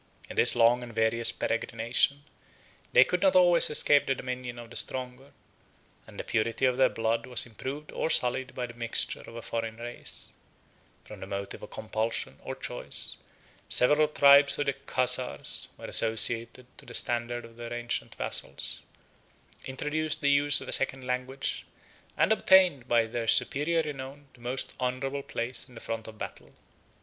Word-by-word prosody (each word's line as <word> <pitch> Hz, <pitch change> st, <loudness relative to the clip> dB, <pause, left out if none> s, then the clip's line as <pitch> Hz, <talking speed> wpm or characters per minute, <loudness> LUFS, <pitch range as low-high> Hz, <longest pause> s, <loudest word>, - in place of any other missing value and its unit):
In -, -, -9 dB
this -, -, +7 dB
long 120 Hz, +1 st, +4 dB
and 120 Hz, -2 st, -10 dB
various 115 Hz, +1 st, +2 dB
peregrination, 115 Hz, +6 st, -1 dB, 0.7 s
they -, -, +7 dB
could -, -, -2 dB
not 285 Hz, -, +3 dB
always 175 Hz, -2 st, +5 dB
escape 145 Hz, -1 st, +3 dB
the 135 Hz, -, +1 dB
dominion 125 Hz, -1 st, -6 dB
of 120 Hz, -1 st, -11 dB
the -, -, -12 dB
stronger; 130 Hz, +1 st, -4 dB, 0.8 s
and -, -, -12 dB
the -, -, -3 dB
purity 115 Hz, +4 st, -1 dB
of 125 Hz, -1 st, +1 dB
their 130 Hz, -1 st, +4 dB
blood 115 Hz, +1 st, -2 dB
was 125 Hz, -2 st, +2 dB
improved 135 Hz, +6 st, -7 dB
or -, -, -2 dB
sullied 130 Hz, -2 st, +2 dB
by 125 Hz, -, -3 dB
the 115 Hz, -, -11 dB
mixture 115 Hz, -1 st, -1 dB
of 115 Hz, -, -13 dB
a 115 Hz, -, -8 dB
foreign 115 Hz, -1 st, -4 dB
race: 120 Hz, +1 st, -4 dB, 0.7 s
from -, -, -12 dB
a 95 Hz, -, -7 dB
motive 100 Hz, 0 st, -6 dB
of -, -, -10 dB
compulsion, 110 Hz, +1 st, -4 dB
or -, -, -6 dB
choice, -, -, -5 dB, 0.5 s
several 150 Hz, +4 st, +4 dB
tribes 140 Hz, -1 st, +6 dB
of 145 Hz, -, -1 dB
the 140 Hz, -, 0 dB
Chazars 130 Hz, -2 st, 0 dB
were -, -, -10 dB
associated 115 Hz, +2 st, +1 dB
to -, -, -12 dB
the 120 Hz, -, -7 dB
standard 120 Hz, 0 st, 0 dB
of 115 Hz, 0 st, -16 dB
their 120 Hz, 0 st, -8 dB
ancient 120 Hz, 0 st, -3 dB
vassals; 70 Hz, 0 st, -4 dB, 0.8 s
introduced 155 Hz, +4 st, -1 dB
the 145 Hz, -1 st, +3 dB
use 145 Hz, 0 st, +3 dB
of -, -, -9 dB
a -, -, -5 dB
second 135 Hz, -1 st, +1 dB
language; 125 Hz, +2 st, -3 dB, 0.5 s
and -, -, +2 dB
obtained 185 Hz, -, +4 dB
by 120 Hz, -2 st, +3 dB
their 115 Hz, 0 st, -4 dB
superior 160 Hz, +7 st, +4 dB
renown 140 Hz, -1 st, -8 dB
the 125 Hz, -, -20 dB
most 125 Hz, +2 st, -1 dB
honorable 130 Hz, +2 st, -2 dB
place 125 Hz, 0 st, -5 dB
in 125 Hz, -, -17 dB
the -, -, -9 dB
front 115 Hz, -1 st, -5 dB
of 110 Hz, -1 st, -11 dB
battle. -, -, -9 dB
125 Hz, 170 wpm, -28 LUFS, 115-140 Hz, 0.8 s, this